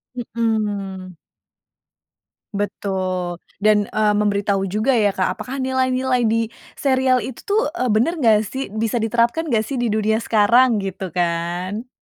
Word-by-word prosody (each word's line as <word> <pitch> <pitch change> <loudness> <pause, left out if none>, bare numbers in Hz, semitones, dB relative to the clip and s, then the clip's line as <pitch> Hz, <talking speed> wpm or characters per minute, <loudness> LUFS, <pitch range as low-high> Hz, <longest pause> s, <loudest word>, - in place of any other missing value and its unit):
Mhm. 210 -6 -3 1.4
Betul 185 -3 -3 0.2
dan, 210 -1 +4
eee, 215 -1 +2
memberitahu 200 -1 +1
juga 215 +7 +1
ya 205 -4 +2
Kak 185 0 -1
apakah 260 - -5
nilai-nilai 260 -1 +1
di 225 +1 +1 0.3
serial 260 -2 +2
itu 260 - -7
tuh, 415 +2 +2
eee, 255 -8 -1
bener 245 +11 +1
nggak 220 -5 +4
sih? 265 +6 -5
Bisa 220 +3 -1
diterapkan 235 +8 +1
nggak 225 -6 +1
sih 270 +1 -3
di 240 - +1
dunia 220 +1 +1
sekarang 230 +3 +4
gitu 190 -1 -5
kan? 175 +6 -2
215 Hz, 135 wpm, -21 LUFS, 200-250 Hz, 1.4 s, dan